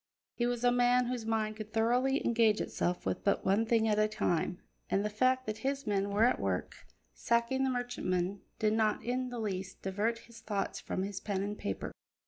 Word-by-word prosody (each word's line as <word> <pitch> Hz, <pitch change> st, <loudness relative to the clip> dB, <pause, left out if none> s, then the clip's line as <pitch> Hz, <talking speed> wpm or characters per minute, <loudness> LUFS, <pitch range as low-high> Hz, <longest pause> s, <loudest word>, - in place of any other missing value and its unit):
He 240 Hz, -, 0 dB
was 245 Hz, -1 st, -2 dB
a 245 Hz, -, +5 dB
man 245 Hz, 0 st, +4 dB
whose 240 Hz, -2 st, -3 dB
mind 215 Hz, -1 st, 0 dB
could 215 Hz, 0 st, -8 dB
thoroughly 250 Hz, +5 st, +2 dB
engage 225 Hz, -2 st, +3 dB
itself 175 Hz, 0 st, -2 dB
with -, -, -2 dB
but 200 Hz, -, +1 dB
one 205 Hz, +4 st, +3 dB
thing 225 Hz, -1 st, +3 dB
at 210 Hz, -1 st, +2 dB
a 215 Hz, -, +4 dB
time, 180 Hz, -4 st, -1 dB, 0.3 s
and 200 Hz, +2 st, +1 dB
the 210 Hz, -, -1 dB
fact 255 Hz, +4 st, +2 dB
that 215 Hz, 0 st, -4 dB
his 275 Hz, +1 st, -2 dB
men 200 Hz, -1 st, 0 dB
were 205 Hz, +2 st, +2 dB
at 245 Hz, -, +4 dB
work 95 Hz, -2 st, -3 dB, 0.3 s
sacking 235 Hz, -, +1 dB
the 265 Hz, -, +2 dB
merchantman 200 Hz, -7 st, -1 dB, 0.2 s
did 215 Hz, 0 st, +2 dB
not 220 Hz, -1 st, +1 dB
in 250 Hz, +1 st, -1 dB
the 245 Hz, -, -6 dB
least 190 Hz, -4 st, -4 dB
divert 210 Hz, +5 st, 0 dB
his 230 Hz, 0 st, -14 dB
thoughts 205 Hz, -2 st, -2 dB
from 185 Hz, -, -3 dB
his 195 Hz, 0 st, -4 dB
pen 195 Hz, -2 st, -2 dB
and 205 Hz, +1 st, -3 dB
paper. 100 Hz, -, -3 dB
220 Hz, 205 wpm, -32 LUFS, 200-245 Hz, 0.3 s, a